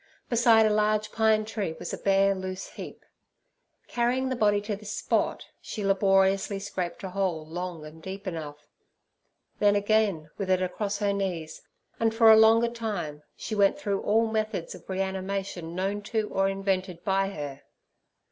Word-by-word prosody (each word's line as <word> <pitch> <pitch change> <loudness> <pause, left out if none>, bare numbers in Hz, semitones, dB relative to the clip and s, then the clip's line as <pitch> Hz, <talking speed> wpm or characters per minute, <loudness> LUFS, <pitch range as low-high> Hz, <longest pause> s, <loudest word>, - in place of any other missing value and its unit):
Beside 230 -2 +5
a 215 - +3
large 215 0 +1
pine 220 -1 +2
tree 210 -6 -3
was - - -6
a - - -3
bare, 195 0 +3
loose 185 -1 -5
heap; - - -10 0.8
carrying 250 +2 0
the 260 - -1
body 205 -3 +3
to 205 0 -3
this 210 +1 -8
spot, - - -1 0.2
she 210 - -5
laboriously 195 0 +3
scraped 190 -2 -4
a 190 - -5
hole 180 -5 -1
long 170 -1 -6
and 155 +1 -12
deep 195 +3 -7
enough. 150 -5 -6 0.9
Then 205 -1 +4
again, 205 -7 +1
with 195 -2 -3
it 185 -1 +3
across 200 +2 -2
her 200 -1 0
knees, 180 -5 -3 0.4
and 225 -1 +1
for 225 -1 +7
a - - +9
longer 225 +2 +6
time, 200 -11 -4
she - - -6
went 200 +5 +3
through 200 -9 -2
all 225 +2 +3
methods 215 -5 -2
of - - -14
reanimation 190 -2 -3
known 195 +3 -1
to 220 -2 -1
or 195 0 +1
invented 190 -3 -2
by 195 0 +1
her. 145 -6 -6
195 Hz, 165 wpm, -27 LUFS, 185-215 Hz, 0.9 s, a